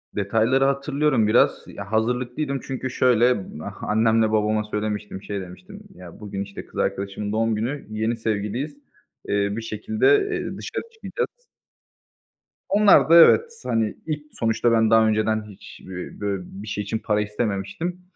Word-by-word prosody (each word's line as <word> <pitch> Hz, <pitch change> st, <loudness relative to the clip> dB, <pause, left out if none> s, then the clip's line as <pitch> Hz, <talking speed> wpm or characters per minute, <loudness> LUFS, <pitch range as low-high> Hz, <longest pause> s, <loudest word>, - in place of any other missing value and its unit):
Detayları 115 Hz, +6 st, +2 dB
hatırlıyorum 140 Hz, -3 st, +1 dB
biraz. 110 Hz, -, +3 dB
Ya, 100 Hz, 0 st, -9 dB
hazırlıklıydım 125 Hz, +5 st, -1 dB
çünkü 130 Hz, -1 st, -4 dB
şöyle, 125 Hz, -4 st, +3 dB, 0.2 s
ah -, -, -8 dB
annemle 110 Hz, 0 st, +2 dB
babama 105 Hz, 0 st, +1 dB
söylemiştim, 105 Hz, -2 st, -4 dB
şey 100 Hz, -1 st, -4 dB
demiştim: 90 Hz, 0 st, -11 dB
Ya, 90 Hz, -2 st, -12 dB
bugün, 100 Hz, -2 st, -5 dB
işte, 100 Hz, 0 st, -9 dB
kız -, -, -8 dB
arkadaşımın 100 Hz, +1 st, -2 dB
doğum 115 Hz, 0 st, +1 dB
günü, 125 Hz, +7 st, -3 dB
yeni 110 Hz, +2 st, -1 dB
sevgiliyiz, 110 Hz, +6 st, -2 dB, 0.5 s
eee, 100 Hz, 0 st, +1 dB
bir -, -, -3 dB
şekilde, 215 Hz, -, -1 dB, 0.2 s
eee, -, -, -3 dB
dışarı -, -, -5 dB
çıkacağız. 480 Hz, +2 st, -5 dB, 1.2 s
Onlar 205 Hz, -4 st, +5 dB
da 165 Hz, -, +7 dB
evet, 455 Hz, -, +6 dB
hani, 110 Hz, -2 st, 0 dB
ilk 150 Hz, -2 st, -3 dB
sonuçta 115 Hz, +1 st, +1 dB
ben 110 Hz, -1 st, +3 dB
daha 110 Hz, 0 st, +5 dB
önceden 110 Hz, 0 st, +1 dB
hiç 100 Hz, -, -13 dB
b 90 Hz, -1 st, -7 dB
bö 100 Hz, -2 st, -1 dB
bir 100 Hz, +4 st, -10 dB
şey 105 Hz, 0 st, -3 dB
için 110 Hz, +2 st, -3 dB
para 105 Hz, -1 st, 0 dB
istememiştim. 105 Hz, -, -3 dB
110 Hz, 150 wpm, -23 LUFS, 105-130 Hz, 1.2 s, da